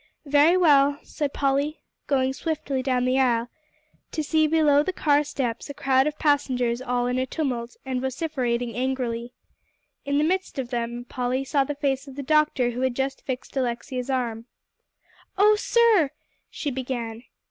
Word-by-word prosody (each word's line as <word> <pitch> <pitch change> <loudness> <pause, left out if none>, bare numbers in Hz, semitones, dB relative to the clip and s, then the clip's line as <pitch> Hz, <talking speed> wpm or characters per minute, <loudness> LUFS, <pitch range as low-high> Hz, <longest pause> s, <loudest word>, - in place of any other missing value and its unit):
"Very 295 +5 +5
well," 285 -5 +5
said 290 -2 -3
Polly, 280 +3 0 0.3
going 265 -2 +1
swiftly 280 -3 -2
down 255 -1 0
the 255 +1 +2
aisle, 240 -2 +2 0.6
to 310 - -2
see 310 +1 +2
below 300 -2 +4
the 340 - -1
car 295 -4 +2
steps 265 -4 -3
a 285 - -6
crowd 265 +1 +2
of 300 0 -3
passengers 255 -5 +1
all 245 -1 -1
in 250 +1 0
a 260 - -1
tumult, 250 -6 -3
and 260 -1 -2
vociferating 255 -4 -2
angrily. 245 -2 -2 0.7
In 280 0 0
the 295 - +3
midst 370 +2 -1
of 260 -2 -4
them, 240 0 -3
Polly 255 +1 -1
saw 275 0 +1
the 290 - -4
face 280 -1 -1
of 270 - -10
the 280 - -5
doctor 300 -4 +2
who 245 +2 -4
had 260 -2 0
just 270 +1 -2
fixed 260 0 -5
Alexia's 250 0 -2
arm. 235 -4 -2 0.9
"Oh 420 +2 +6
sir," 430 - +3 0.4
she 290 - -4
began. 245 -3 -4
265 Hz, 165 wpm, -25 LUFS, 250-290 Hz, 0.9 s, Oh